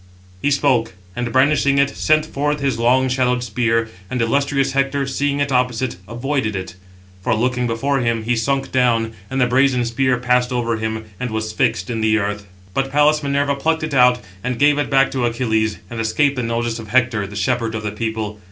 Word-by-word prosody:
He - - +1
spoke, 135 -8 +1 0.2
and 120 -1 -3
brandishing 140 +1 +3
it, 140 0 +3
sent 155 0 +2
forth 150 0 -2
his 135 -4 -1
long 130 +3 +3
shadowed 125 -1 +1
spear, 115 0 0 0.2
and 130 - -2
illustrious 135 +3 +1
Hector, 140 +1 0
seeing 140 +1 -1
it 145 -1 0
opposite, 125 -2 0
avoided 120 -1 -2
it; 95 -1 -5 0.5
for, 100 - +1
looking 125 +2 0
before 135 +5 0
him, 115 -2 0
he 120 +2 0
sunk 135 +4 -1
down, 115 -3 +1 0.2
and 135 - -2
the 125 - +4
brazen 125 0 +2
spear 125 +2 +1
passed 125 +1 +1
over 120 -2 -1
him, 110 0 -3
and 125 - -3
was 110 0 -3
fixed 90 -1 0
in 115 -1 -2
the 110 0 +3
earth. 105 -1 -3 0.3
But 135 +3 -1
Pallas 150 +2 +3
Minerva 140 0 0
plucked 160 +3 0
it 155 -2 -3
out, 125 -1 +5 0.2
and 125 -1 -2
gave 145 +2 +4
it 145 - -1
back 135 0 +3
to 130 -2 -1
Achilles, 110 -2 0
and 115 - -7
escaped 135 +6 +1
the 125 - -2
notice 115 0 -2
of 110 - -8
Hector, 120 -3 +1
the 100 - -10
shepherd 115 +2 -1
of 110 - -4
the 105 - -2
people. 110 -1 -4
125 Hz, 200 wpm, -19 LUFS, 115-135 Hz, 0.5 s, out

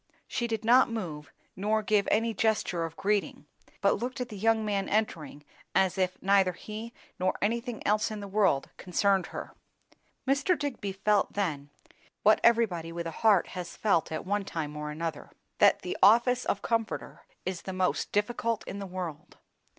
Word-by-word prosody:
She 240 -2 -2
did 225 -1 -3
not 250 +3 +6
move, 160 - -5 0.2
nor 215 +3 0
give 210 -1 +2
any 225 +1 +2
gesture 210 -6 0
of 165 0 -8
greeting, 200 -7 -1 0.4
but 200 0 +3
looked 255 +4 -4
at 250 -1 -3
the 215 - -8
young 220 +2 +2
man 200 -2 -1
entering 155 -9 -2 0.3
as 190 -2 +3
if 185 -1 0
neither 195 -1 +4
he 215 +5 -7 0.3
nor 185 0 0
anything 230 +2 -2
else 215 +2 +2
in 215 -1 -5
the 200 - -6
world 195 -8 +1
concerned 190 +1 +1
her. - - -7 0.7
Mr. 280 +6 +2
Digby 260 -9 -3
felt 205 +2 +1
then, 150 -8 -2 0.5
what 215 +1 +5
everybody 200 -9 +3
with 170 0 -5
a 165 - -3
heart 205 -1 +3
has 180 -2 -7
felt 195 -8 +1
at 155 - -4
one 205 +2 0
time 155 -5 -4
or 150 0 -4
another, 165 +2 -4 0.3
that - - +5
the - - -3
office 240 +3 +5
of 200 - -1
comforter 230 -1 -2 0.2
is 185 -2 -3
the 190 - -6
most 185 0 0
difficult 230 +1 0
in 200 - -5
the 200 - -5
world. 175 -5 -7
200 Hz, 175 wpm, -29 LUFS, 180-225 Hz, 0.7 s, not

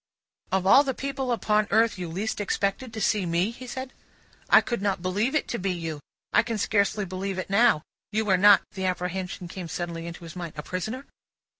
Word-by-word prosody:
"Of 190 -1 +1
all 270 +9 +7
the 265 -3 -2
people 270 -2 -3
upon 215 -2 +2
earth, 225 -3 +3
you 175 -2 -4
least 205 +6 -3
expected 205 +4 -1
to 220 - -6
see 210 -1 +2
me?" 170 +6 +1
he 250 +2 -10
said. 260 +1 -6 0.6
"I - - +9
could 235 -4 -3
not 195 -3 -1
believe 205 +9 0
it 305 - +1
to 235 - -2
be 195 +1 -1
you. 165 -4 -3 0.3
I - - +6
can 230 -2 -3
scarcely 205 0 +1
believe 190 +1 -4
it 185 - -4
now. 210 -7 +4 0.3
You 215 0 0
are - - +6
not" 200 +1 +7
the 190 -1 -4
apprehension 180 0 -3
came 180 0 -7
suddenly 170 0 -4
into 170 0 -8
his 165 0 -9
mind 175 -3 -6
"a 150 - -4
prisoner?" 220 - -4
195 Hz, 205 wpm, -26 LUFS, 180-225 Hz, 0.6 s, I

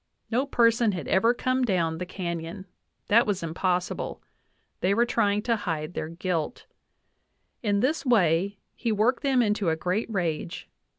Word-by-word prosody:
No 255 +5 +1
person 230 -3 +3
had 175 -7 -5
ever 225 +5 +4
come 255 +1 0
down 170 -7 0
the 180 - -4
canyon; 170 -1 -5 0.4
that 230 +3 +4
was 195 -4 -1
impossible; 180 +2 -1 0.6
they 195 +2 +2
were 235 +2 +4
trying 210 -3 +1
to 230 -1 +2
hide 165 -6 -3
their 155 - -4
guilt.... 170 +2 -3 1.0
In 205 -3 +1
this 290 +6 +1
way 200 - +2 0.2
he 235 - -1
worked 230 +4 +2
them 265 -3 +3
into 210 -4 +1
a 160 - +1
great 180 +8 -2
rage. 170 -4 -2
200 Hz, 155 wpm, -26 LUFS, 175-230 Hz, 1.0 s, ever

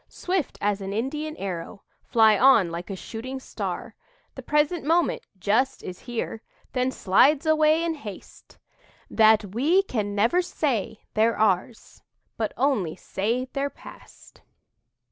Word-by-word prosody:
Swift 360 -4 -3
as 205 0 0
an 195 0 -5
Indian 300 +8 -3
arrow 190 +1 -6 0.2
Fly 220 -2 +4
on 225 -7 +5
like 170 +3 -6
a 195 - -4
shooting 245 +7 -7
star. - - -5 0.4
The - - -8
present 300 +3 +1
moment, 330 +4 +1 0.2
just, 220 +8 0
is 180 - -7
here, 235 -2 -5 0.3
Then 255 0 +1
slides 270 - +3
away 315 +1 +3
in 335 -1 0
haste, 215 - -11 0.5
That 215 -3 +4
we 320 - +3
can 210 - -3
never 230 - +3
say 265 - -2
they're 225 +2 +2
ours, 215 +1 -1 0.3
But 220 -2 -2
only 240 - +1
say 225 +7 -2
they're 280 0 -1
past." - - -15
235 Hz, 135 wpm, -25 LUFS, 205-295 Hz, 0.5 s, on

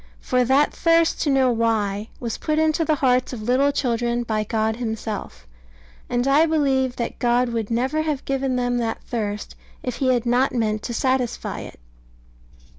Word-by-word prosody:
For 250 -1 +1
that 270 +4 +3
thirst 330 0 +2
to 295 - +1
know 265 -2 +3
why 220 -3 0
was 235 -3 -4
put 310 -1 -1
into 315 +1 +2
the 310 -1 +2
hearts 255 0 +2
of 220 -4 -6
little 260 +5 +3
children 240 -3 0
by 215 -2 -1
God 220 +1 -1
Himself; 220 - -5 0.6
and 245 +2 0
I 295 +4 +5
believe 270 -5 +1
that 235 - -4
God 245 0 +2
would 230 -3 -3
never 260 +7 0
have 305 -3 -2
given 270 -1 -1
them 245 -1 0
that 225 -1 -3
thirst 210 -3 -4 0.3
if 250 -2 -3
He 260 -2 +2
had 245 -2 +1
not 250 +2 +2
meant 215 -2 0
to 235 - -5
satisfy 255 -1 -1
it. - - -10
245 Hz, 175 wpm, -22 LUFS, 230-270 Hz, 0.6 s, I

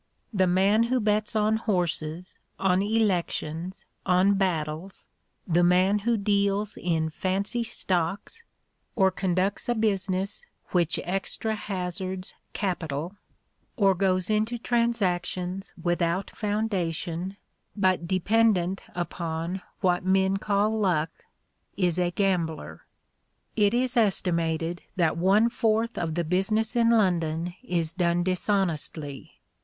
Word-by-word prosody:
The 190 -2 +3
man 195 +5 +3
who 255 0 +2
bets 215 0 0
on 215 +1 +3
horses, 180 -5 -2 0.2
on 185 -1 +2
elections, 185 -5 -1 0.2
on 185 +2 +4
battles 175 -2 -2 0.4
the 175 0 +3
man 185 +4 +4
who 230 +2 +1
deals 200 0 +1
in 160 -2 -1
"fancy" 200 +7 -1
stocks, 195 - -2 0.5
or 190 -3 +4
conducts 190 +3 -1
a 240 - +2
business 195 - -1 0.3
which 175 -2 +1
extra 195 +4 -2
hazards 185 -2 -4 0.2
capital, 170 -3 -3 0.6
or 195 -4 +4
goes 185 +1 +1
into 215 +3 +1
transactions 195 -6 -1
without 175 +2 0
foundation, 190 -4 -2 0.4
but 185 -4 +1
dependent 195 -1 +2
upon 170 +1 -3 0.2
what 180 -2 +2
men 190 +1 +2
call 210 +2 +1
"luck," 165 -6 +1 0.7
is 180 -2 +1
a 175 -1 +2
gambler. 175 -4 -2 0.7
It 210 0 +3
is 250 0 0
estimated 170 -6 +1
that 165 -4 +2
one 195 +6 +4
fourth 230 -1 0
of 165 -2 -2
the 175 - 0
business 215 +7 0
in 230 -1 +4
London 175 -6 +1
is 170 -10 -1
done 175 -1 +1
dishonestly. 175 -6 -2
190 Hz, 110 wpm, -26 LUFS, 175-210 Hz, 0.7 s, on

